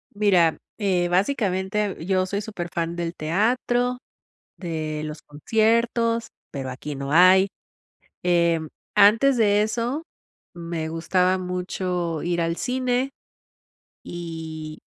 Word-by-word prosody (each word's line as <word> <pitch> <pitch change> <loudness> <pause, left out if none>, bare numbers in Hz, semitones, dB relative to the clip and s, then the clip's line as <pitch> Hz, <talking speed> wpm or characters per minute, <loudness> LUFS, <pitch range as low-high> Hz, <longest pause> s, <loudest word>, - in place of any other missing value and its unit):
Mira, 185 -6 +3 0.2
eh, 185 -4 +1
básicamente, 195 0 0
yo 185 -1 +2
soy 200 +2 -2
súper 185 -5 -6
fan 170 0 -2
del 170 0 -3
teatro, 245 +8 +1 0.6
de 155 -3 -4
los 150 0 -7
conciertos, 230 +7 +1 0.2
pero 135 -2 -4
aquí 145 +3 -6
no 140 +1 -5
hay. 185 +3 +7 0.8
Em, 170 -3 +2 0.3
antes 225 +7 +6
de 210 -2 +3
eso 235 +8 -1 0.5
me 170 -2 -4
gustaba 180 +3 +1
mucho 180 -2 -3
ir 175 0 -1
al 165 0 0
cine 255 +2 0 0.9
y 160 -2 -7
180 Hz, 110 wpm, -24 LUFS, 165-215 Hz, 0.9 s, hay